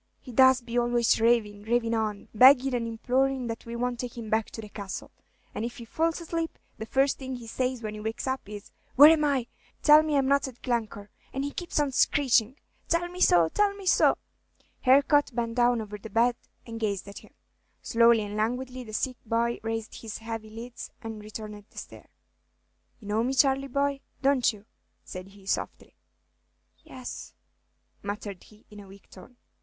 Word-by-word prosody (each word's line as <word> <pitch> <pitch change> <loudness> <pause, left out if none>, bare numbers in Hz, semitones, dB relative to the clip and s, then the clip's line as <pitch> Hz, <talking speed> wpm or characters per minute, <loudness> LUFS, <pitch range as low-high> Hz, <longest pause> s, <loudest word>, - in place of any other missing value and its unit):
"He 255 - -11
does 260 +1 +5
be 240 0 -1
always 240 -2 +2
ravin', 225 -3 +2
ravin' 230 +1 0
on, 215 -2 -2
beggin' 260 +3 +6
and 235 -2 -1
implorin' 255 +3 0
that 230 0 -6
we 235 - -5
won't 245 0 -2
take 245 -1 -6
him 220 -3 -7
back 220 0 +1
to - - -9
the 215 - -9
Castle; 200 -2 -7 0.4
and 210 - -4
if 240 +4 -5
he 235 - -9
falls 325 +7 -1
asleep, 330 -1 -4 0.2
the 220 - -6
first 270 +3 +1
thing 260 -1 -5
he 245 -2 -9
says 250 +1 -2
when 215 -1 -4
he 215 - -7
wakes 220 +1 -4
up 260 -6 -3
is, 205 -1 -9 0.2
'Where 290 +4 +10
am 315 -2 +3
I? 275 -5 +1 0.4
tell 300 0 +8
me 310 -2 0
I'm 270 - +2
not 280 0 +2
at 250 -2 -12
Glencore!' 220 -4 -3 0.2
and 270 - -3
he 285 - -3
keeps 350 -1 -3
on 290 -2 +1
screechin', 255 -3 +2 0.3
'Tell 345 +1 +1
me, 360 +1 -8
tell 275 - +4
me 400 -1 -10
so!'" 365 - +4 0.7
Harcourt 280 0 +4
bent 230 -1 -1
down 240 -1 +2
over 210 -1 -7
the 220 - -9
bed 235 +3 +2 0.3
and 230 -1 -7
gazed 200 -3 -2
at 200 - -9
him. - - -20 0.5
Slowly 230 -1 +4
and 205 0 -6
languidly 250 +4 -2
the 215 -2 -11
sick 250 +3 -2
boy 235 +1 0
raised 225 -1 -5
his 220 -2 -6
heavy 225 -1 -6
lids 230 +3 -8
and 225 -1 -6
returned 210 -1 -8
the - - -23
stare. - - -10 0.9
"You 210 - -13
know 215 +2 +1
me, 260 +2 -1
Charley, 270 +1 +3
boy, 280 +1 0 0.2
don't 270 -3 +3
you?" 210 -1 -15 0.4
said 185 +1 -8
he, 195 0 -17
softly. - - -3 0.9
"Yes," 255 -1 -9 0.7
muttered 205 -1 -6
he, 215 0 -20
in 210 - -11
a 200 - -12
weak 195 0 -16
tone. 240 +6 -15
235 Hz, 190 wpm, -27 LUFS, 215-265 Hz, 0.9 s, Where